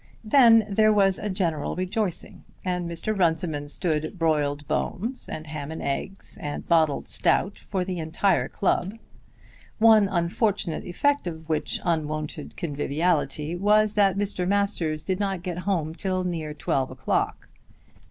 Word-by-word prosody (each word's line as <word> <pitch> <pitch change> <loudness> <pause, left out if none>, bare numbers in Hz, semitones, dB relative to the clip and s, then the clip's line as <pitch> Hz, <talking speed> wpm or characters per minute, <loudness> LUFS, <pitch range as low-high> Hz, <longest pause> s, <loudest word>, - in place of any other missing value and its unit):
Then 225 -2 +6
there 215 +2 +4
was 195 -2 +3
a 210 - -3
general 170 -6 -1
rejoicing, 185 0 -3 0.2
and 180 -2 -1
Mr. 170 +6 -2
Runciman 160 -5 0
stood 155 +1 -2
broiled 150 -3 0
bones, 225 - -2
and 155 - -6
ham 150 -1 -6
and 160 - -6
eggs, 165 +8 -4
and 145 0 -5
bottled 160 -4 +3
stout 195 - +1
for 185 -2 -3
the 180 -2 -3
entire 165 +5 +1
club; 195 +2 0 0.8
one 220 -2 +6
unfortunate 180 0 -1
effect 285 +7 0
of 160 -2 -6
which 155 -2 -1
unwonted 155 -2 -2
conviviality 150 0 -1
was 210 +3 +3
that 195 -2 +3
Mr. 195 -3 -1
Masters 185 -6 0
did 185 0 -2
not 195 -3 -2
get 180 -2 -4
home 160 -5 0
till 185 +1 -2
near 160 -4 -3
twelve 135 -3 -1
o'clock. - - -2
175 Hz, 140 wpm, -25 LUFS, 155-200 Hz, 0.8 s, Then